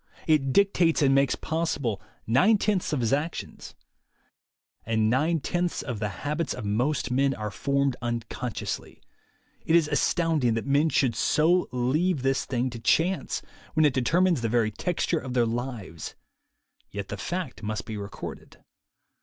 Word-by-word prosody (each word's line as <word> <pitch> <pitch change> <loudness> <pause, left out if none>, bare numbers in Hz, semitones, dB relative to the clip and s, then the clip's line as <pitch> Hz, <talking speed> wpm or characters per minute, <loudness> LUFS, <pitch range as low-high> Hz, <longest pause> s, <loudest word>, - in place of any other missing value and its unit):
It 145 -4 +2
dictates 175 -4 +3
and 135 -1 +4
makes 135 -1 +3
possible 145 - -2 0.2
nine 165 - +4
tenths 200 -2 0
of 145 -4 0
his 115 +2 +1
actions. 150 +4 -4 1.1
Amd 115 -1 0
nine 140 +10 +2
tenths 175 +3 -1
of 120 -6 -4
the 105 -1 -1 0.2
habits 150 +2 -1
of - - -6
most 125 +8 0
men 135 +1 +2
are 105 -1 -4
formed 140 +2 0
unconsciously. 120 -1 -4 0.6
It 165 - +2
is 165 -3 +4
astounding 150 -4 +1
that 115 - -2
men 145 +3 +3
should 130 -6 +2
so 170 +9 +2
leave 135 +5 +1
this 135 0 +1
thing 125 0 -1
to 115 - -7
chance, 175 +10 +1 0.3
when 155 -1 +5
it 145 - +3
determines 165 +5 +2
the 115 - 0
very 115 -2 +2
texture 170 - -1
of 130 -3 -6
their 120 -2 +4
lives; 115 - -5 0.7
yet 100 -1 -6
the - - -3
fact 165 - -4
must 110 -2 -3
be 110 - -5
recorded. 100 -1 -8
135 Hz, 155 wpm, -26 LUFS, 115-160 Hz, 1.1 s, when